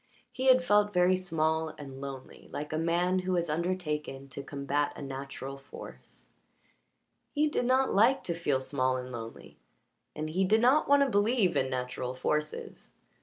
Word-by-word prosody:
He 260 +1 -2
had 255 0 +6
felt 210 -3 +3
very 180 +1 +5
small 160 -3 -1
and 135 -2 -9
lonely, 135 -2 -9
like 150 +1 -5
a - - 0
man 175 +3 +1
who 185 0 -1
has 170 -3 0
undertaken 150 -5 -3
to 140 - -6
combat 140 +1 -2
a - - -8
natural 135 0 -6
force; 135 - -12 1.1
he 300 +1 +3
did 295 -4 -1
not 260 +1 +3
like 235 +7 +4
to 170 - -2
feel 145 -6 0
small 130 -1 0
and 125 0 -6
lonely, 115 -2 -9 0.6
and 155 +1 -4
he 185 +4 +1
did 215 +4 +4
not 260 +7 +4
want 285 0 +6
to 275 - 0
believe 205 -2 +2
in 130 - +1
natural 125 0 -3
forces. 150 +4 -3
160 Hz, 170 wpm, -30 LUFS, 140-200 Hz, 1.1 s, had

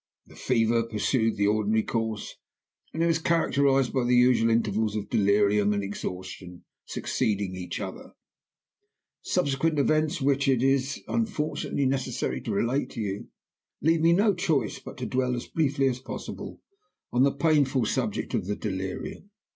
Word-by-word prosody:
"The - - -17
fever 115 -2 +2
pursued 115 +1 0
the 100 - +2
ordinary 110 +1 +2
course, 110 -2 -3 0.6
and 165 +1 0
was 165 -1 +2
characterized 140 -5 +2
by 130 - +1
the 125 +1 +3
usual 125 -2 +4
intervals 110 -2 +1
of 105 -1 -4
delirium 105 0 +3
and 100 0 -1
exhaustion 95 -2 -6 0.2
succeeding 100 -3 -1
each 90 -1 -5
other. - - -7 1.1
Subsequent 155 -2 0
events, 155 +2 +2
which 140 0 +1
it 130 -2 +3
is, 135 +1 +1
unfortunately, 155 -10 -1
necessary 130 - -1
to - - -4
relate 120 +7 0
to 120 - -8
you, 100 -2 -3 0.5
leave 160 +2 +2
me 165 +1 +5
no 200 +4 +4
choice 170 -6 0
but - - -10
to - - -4
dwell 125 -1 0
(as 120 - -5
briefly 140 -3 +1
as 125 -1 -1
possible) 130 - -7 0.5
on 120 - +3
the 140 +1 +5
painful 140 -4 +2
subject - - -2
of 90 - -1
the 105 - -1
delirium. 95 - -5
125 Hz, 150 wpm, -27 LUFS, 105-140 Hz, 1.1 s, me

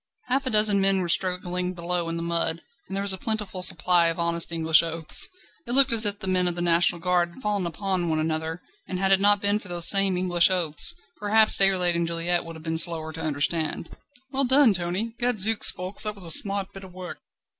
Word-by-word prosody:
Half 270 +1 -2
a - - -1
dozen 210 -2 +4
men 195 0 +1
were 175 - -4
struggling 180 0 -2
below 170 0 -4
in 165 - -4
the 165 - -4
mud, 170 -1 -3 0.2
and 195 - -6
there 200 - -3
was 200 -1 +2
a 190 - -5
plentiful 210 -4 -4
supply 175 0 +1
of 165 +1 -4
honest 170 0 0
English 160 -1 +2
oaths. 165 -1 -1 0.4
It 240 - -4
looked 270 -1 +4
as 225 -2 +5
if 205 0 -1
the 195 - -7
men 185 -1 0
of 175 - -3
the 175 - -5
National 170 0 0
Guard 175 0 -2
had 260 - -16
fallen 205 -4 -2
upon 185 -1 -3
one 160 - -1
another, 160 +1 -4 0.2
and 185 - -6
had 195 +1 -1
it 195 - +3
not 205 0 +2
been 205 +1 +1
for 205 - -14
those 175 -1 +4
same 195 -2 +1
English 175 -1 +1
oaths 180 - +1 0.2
perhaps 215 +1 +4
Déroulède 185 -3 +2
and 170 0 -2
Juliette 170 +1 -2
would 165 0 -11
have 160 - -14
been 160 0 -3
slower 160 -2 -1
to 160 - -9
understand. 155 +2 -3 0.4
"Well 275 +1 0
done, 260 -3 +4
Tony! 185 +5 -2
Gadzooks, 225 -3 +3
Ffoulkes, 185 +2 -3
that 210 -1 +1
was 195 - -7
a 165 - 0
smart 195 +3 +1
bit 195 - -12
of 190 - -13
work!" 185 -1 -10
180 Hz, 230 wpm, -23 LUFS, 170-200 Hz, 0.4 s, as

